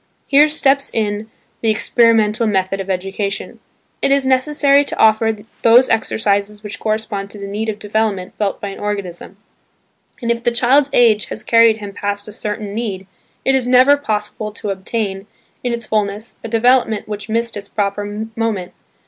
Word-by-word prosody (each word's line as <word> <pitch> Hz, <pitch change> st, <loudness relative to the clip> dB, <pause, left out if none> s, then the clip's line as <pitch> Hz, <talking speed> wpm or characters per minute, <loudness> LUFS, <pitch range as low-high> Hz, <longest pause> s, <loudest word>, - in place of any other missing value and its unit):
Here 290 Hz, +2 st, +5 dB
steps 280 Hz, -2 st, +2 dB
in 215 Hz, 0 st, -2 dB, 0.3 s
the 225 Hz, -, +1 dB
experimental 225 Hz, 0 st, +2 dB
method 195 Hz, -1 st, 0 dB
of 195 Hz, 0 st, -5 dB
education. 195 Hz, +2 st, -3 dB, 0.4 s
It -, -, +1 dB
is 275 Hz, -1 st, +3 dB
necessary 280 Hz, +2 st, +3 dB
to -, -, -5 dB
offer 220 Hz, 0 st, +4 dB, 0.3 s
those 240 Hz, +3 st, +6 dB
exercises 210 Hz, -1 st, 0 dB
which 210 Hz, -, -6 dB
correspond 215 Hz, -2 st, -2 dB
to 210 Hz, -, -9 dB
the 200 Hz, -, -7 dB
need 210 Hz, +3 st, -3 dB
of 210 Hz, -, -3 dB
development 210 Hz, -3 st, -2 dB
felt 205 Hz, -2 st, -1 dB
by 205 Hz, -, -5 dB
an 195 Hz, -, -9 dB
organism, 200 Hz, -2 st, -5 dB, 0.8 s
and 235 Hz, -2 st, -1 dB
if 235 Hz, 0 st, -2 dB
the -, -, +3 dB
child's 260 Hz, +4 st, +3 dB
age 220 Hz, -3 st, +4 dB
has -, -, -6 dB
carried 230 Hz, -1 st, +5 dB
him 205 Hz, -2 st, -8 dB
past 205 Hz, +1 st, -3 dB
a -, -, -7 dB
certain 210 Hz, 0 st, -4 dB
need, 205 Hz, -4 st, -4 dB, 0.4 s
it 270 Hz, -, +3 dB
is 260 Hz, -2 st, +1 dB
never 255 Hz, +3 st, +6 dB
possible 215 Hz, -5 st, -3 dB
to 205 Hz, -1 st, -4 dB
obtain, 195 Hz, 0 st, -3 dB, 0.4 s
in 245 Hz, -, -1 dB
its 235 Hz, -1 st, -3 dB
fulness, 210 Hz, 0 st, -2 dB
a -, -, -4 dB
development 230 Hz, -1 st, +2 dB
which 210 Hz, 0 st, -6 dB
missed 230 Hz, +1 st, -1 dB
its 205 Hz, -1 st, -7 dB
proper 205 Hz, +1 st, -3 dB
moment. 215 Hz, -6 st, -2 dB
215 Hz, 170 wpm, -18 LUFS, 205-235 Hz, 0.8 s, those